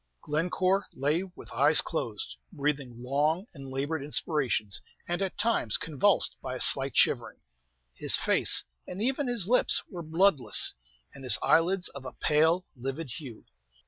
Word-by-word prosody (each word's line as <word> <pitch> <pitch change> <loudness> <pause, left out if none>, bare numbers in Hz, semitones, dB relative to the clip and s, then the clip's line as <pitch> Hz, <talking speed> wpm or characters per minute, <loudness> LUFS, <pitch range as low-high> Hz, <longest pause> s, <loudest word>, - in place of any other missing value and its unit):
Glencore 185 +5 -1
lay 145 +6 -1
with 190 -2 -12
closed - - +1
eyes, - - -11 0.2
breathing 140 -6 -3
long 145 - -1
and 135 -4 -10
labored 140 +3 -4
inspirations, 140 - -1 0.3
and 175 +2 -3
at 190 -1 -4
times 225 - 0
convulsed 165 +5 +1
by 130 -1 -6
a - - -6
slight 135 +1 +3
shivering. - - 0 0.5
His - - +2
face, - - +4 0.2
and 180 - -7
even 265 +5 -1
his 235 -7 +1
lips, 250 +3 +4
were 175 -3 -7
bloodless, 165 -2 +3 0.4
and 135 - -11
his 130 - +6
eyelids 180 +3 +2
of 140 - -11
a 125 - -8
pale, 160 +4 +1
livid 135 +3 -6
hue. 125 -8 -12
155 Hz, 145 wpm, -27 LUFS, 135-185 Hz, 0.5 s, his